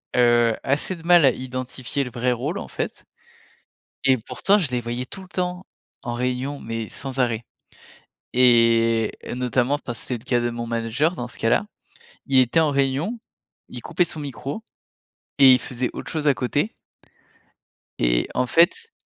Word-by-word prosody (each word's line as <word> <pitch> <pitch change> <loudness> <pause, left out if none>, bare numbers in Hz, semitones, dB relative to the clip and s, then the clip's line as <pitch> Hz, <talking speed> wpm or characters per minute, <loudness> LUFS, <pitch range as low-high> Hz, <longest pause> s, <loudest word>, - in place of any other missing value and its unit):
heu, 120 -2 +4
assez 150 +7 0
de 165 - -14
mal 175 -2 +6
à - - +7
identifier 130 +2 -4
le 125 - -6
vrai 125 +1 0
rôle, 140 +10 -2
en - - -7
fait - - -5 1.0
et 130 -1 +5
pourtant, 195 - +1
je 160 -9 -1
les 125 -1 -1
voyais 120 +2 -4
tout 190 - -7
le 185 - -14
temps 180 0 -3 0.4
en 120 - -4
réunion 125 +3 -2
mais, 115 -1 -5
sans 135 -1 -6
arrêt 115 -2 0 0.9
et 115 -2 +4 0.2
notamment, 125 +3 0
parce 120 -5 -6
que - - -6
c'est 125 -2 -2
le 115 - -19
cas 120 -1 +1
de 120 - 0
mon 120 0 -5
manager, 115 +9 0
dans 120 - -5
ce - - -11
cas-là. 115 - +2 0.6
Il 135 -2 +3
était 130 +6 +4
en 155 -2 +2
réunion. 140 - 0 0.5
Il - - -9
coupait 180 - +1
son 155 -2 -5
micro 140 - -6 0.8
et 135 -2 +8
il 125 - +4
faisait 125 0 -3
autre - - -7
chose 155 -2 -3
à 145 - +5
côté 145 - -1 1.3
et - - +2
en 125 - +1
fait, 190 - +3
130 Hz, 175 wpm, -23 LUFS, 120-145 Hz, 1.3 s, et